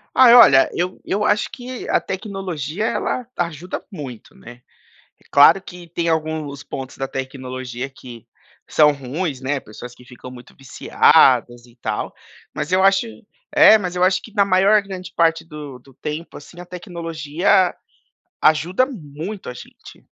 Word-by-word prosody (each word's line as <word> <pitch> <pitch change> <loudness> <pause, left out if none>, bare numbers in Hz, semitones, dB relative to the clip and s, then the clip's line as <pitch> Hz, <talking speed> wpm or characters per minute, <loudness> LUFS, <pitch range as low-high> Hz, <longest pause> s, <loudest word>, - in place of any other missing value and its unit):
Ai 250 -2 +8
olha, 135 - +7
eu 180 +2 -3
eu 210 +2 -1
acho 205 0 +1
que 250 0 -8
a - - +2
tecnologia 190 - -5
ela 250 +1 -2
ajuda 170 +1 -4
muito, 135 - -9
né 120 +1 -14 0.6
É - - -29
claro 145 +7 +6
que 175 -2 -12
tem 170 0 -2
alguns 155 -3 -3
pontos 135 -1 -8
da 135 - -3
tecnologia 130 -1 -6
que 125 -3 -13 0.4
são 150 -1 +5
ruins, 140 +2 -4
né, 135 +2 -2
pessoas 125 +3 -11
que 125 - -18
ficam 125 +1 -12
muito 125 -1 -14
viciadas, 120 -2 +3
e 120 -1 -20
tal, 110 -3 -4 0.4
mas 150 - -4
eu 185 +1 +3
acho 195 +4 +3 0.4
é 300 -7 +7
mas 180 -3 -5
eu 180 - +3
acho 185 0 +2
que - - -13
na 200 -2 +4
maior 195 +2 +4
grande 190 -2 -8
parte 165 -1 +2
do 150 -5 -10
do 135 +2 -21
tempo, 150 +5 -7
assim, 170 +4 -13
a 175 - -10
tecnologia 175 0 -1 0.7
ajuda 175 +10 +2
muito 180 - -8
a - - -8
gente. - - -14
160 Hz, 155 wpm, -20 LUFS, 135-190 Hz, 0.7 s, Ai